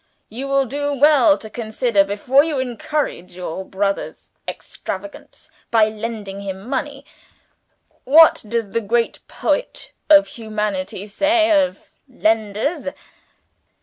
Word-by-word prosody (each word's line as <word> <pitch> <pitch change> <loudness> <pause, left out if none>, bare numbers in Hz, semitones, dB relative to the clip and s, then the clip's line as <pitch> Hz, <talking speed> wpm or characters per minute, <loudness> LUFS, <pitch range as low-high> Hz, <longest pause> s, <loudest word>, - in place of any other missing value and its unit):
You 255 +6 -6
will 275 0 +2
do 285 +3 -2
well 295 +1 +5
to 220 - -9
consider, 220 -1 0
before 210 +8 +2
you 310 -3 -2
encourage 250 - -3
your 180 +1 -5
brother's 195 +1 -3 0.2
extravagance 300 - -8 0.2
by 220 -2 +4
lending 215 -3 -6
him 195 +1 -7
money. 275 +1 -4 1.0
What 315 +5 +6
does 230 -2 -2
the 230 - 0
great 230 +2 0
poet - - -2 0.2
of 300 -1 +8
humanity 210 -4 -4
say 320 - +2
of 290 -3 +1 0.2
lenders? 225 - -1
230 Hz, 115 wpm, -20 LUFS, 205-285 Hz, 1.0 s, of